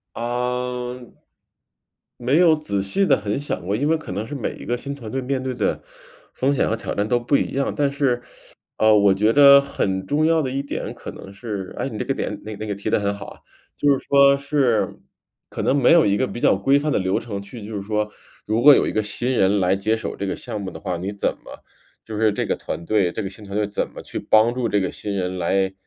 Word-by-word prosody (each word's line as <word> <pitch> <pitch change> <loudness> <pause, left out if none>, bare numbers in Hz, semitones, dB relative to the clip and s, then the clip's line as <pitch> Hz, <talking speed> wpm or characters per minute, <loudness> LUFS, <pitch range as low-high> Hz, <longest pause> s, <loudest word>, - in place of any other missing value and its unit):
呃， 125 +1 -3 1.2
没 130 +5 +1
有 170 -3 +5
仔 100 -11 -2
细 145 - +1
地 - - +5
很 105 +3 -2
想 145 - -4
过， 100 +3 -1
因 145 +6 0
为 165 - +3
可 155 - -8
能 105 +4 -3
是 145 - -6
每 130 -6 -3
一 - - -10
个 120 - -1
新 140 +3 -6
团 120 -6 -9
队 135 - -2
面 130 0 -2
对 130 -1 -3
的 110 -4 -1 0.5
风 135 +2 0
险 140 - +1
和 115 - 0
挑 115 - -5
战 100 - 0
都 120 - +2
不 120 +4 +1
一 - - -1
样， 140 0 0
但 145 -1 +1
是， 140 -4 0 0.6
呃， 110 -1 +5
我 100 -1 +5
觉 105 +3 +2
得 140 +1 +8
很 95 -9 -2
重 150 +7 +1
要 165 -1 +3
的 130 - -2
一 135 +1 -2
点 140 - -5
可 - - -8
能 95 - -11
是， 100 -3 -6
哎， - - -2
你 - - -7
这 - - -2
个 - - 0
点 - - -4
那 110 0 -6
个 105 -1 -4
提 100 - -4
得 - - +3
很 100 -1 -1
好 100 - -8
啊， - - -12 0.4
就 145 - +2
是 - - -9
说 140 0 +6
是 140 -5 +1 0.5
可 - - -5
能 140 - +2
没 135 -3 +5
有 170 -1 +6
一 100 0 +2
个 130 - +1
比 120 - -7
较 - - +4
规 135 +9 +3
范 150 +1 -1
的 - - +2
流 95 -1 0
程 105 -4 -5
去 100 +2 -10
就 110 +1 -7
是 100 - -4
说 105 +1 -1 0.4
如 110 +2 +1
果 145 +3 +9
有 - - +3
一 - - -2
个 110 - +1
新 120 +4 -1
人 100 -4 +3
来 95 +1 +2
接 110 +3 0
手 110 - -5
这 100 - -3
个 95 - -2
项 105 - -6
目 95 -1 -5
的 - - -10
话， 95 -3 -3
你 95 +4 -4
怎 100 - 0
么 - - -12 0.4
就 110 - -7
是 110 0 +3
这 - - -2
个 - - 0
团 85 - -6
队 95 -2 +1
这 - - -3
个 95 - -4
新 100 +2 -11
团 100 0 -6
队 105 0 +1
怎 105 - -2
么 - - -10
去 - - -6
帮 110 +2 +4
助 125 -1 -1
这 105 -1 +1
个 95 - -1
新 100 -1 -5
人 95 -1 -2
来 95 +2 +1
110 Hz, 280 characters per minute, -22 LUFS, 100-135 Hz, 1.2 s, 果